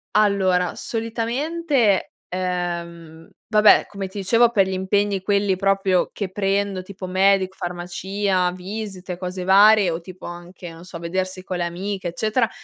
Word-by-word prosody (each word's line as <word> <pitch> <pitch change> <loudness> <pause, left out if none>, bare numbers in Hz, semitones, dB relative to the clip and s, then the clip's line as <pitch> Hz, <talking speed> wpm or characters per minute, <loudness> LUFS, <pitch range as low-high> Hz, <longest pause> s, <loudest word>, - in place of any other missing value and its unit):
Allora 190 -4 +2
solitamente 235 - -1
ehm, 170 -3 -4 0.2
vabbè 215 -1 +6
come 195 -1 -5
ti 200 - -10
dicevo 230 +5 +4
per 195 -5 +3
gli 190 - -3
impegni 195 +1 0
quelli 200 0 +1
proprio 195 -1 +1
che 200 -3 -4
prendo 195 -1 -1
tipo 185 0 -8
medico, 190 0 +2
farmacia, 180 +2 -1
visite, 185 0 -6
cose 180 0 -5
varie 200 +1 +6
o 165 0 -3
tipo 185 +1 -11
anche, 175 +1 -9
non 165 +1 -12
so, 175 -2 -9
vedersi 185 +2 -3
con 185 - -3
le 175 - -1
amiche, 185 +2 -4
eccetera, 220 +6 0
190 Hz, 140 wpm, -22 LUFS, 180-205 Hz, 0.2 s, vabbè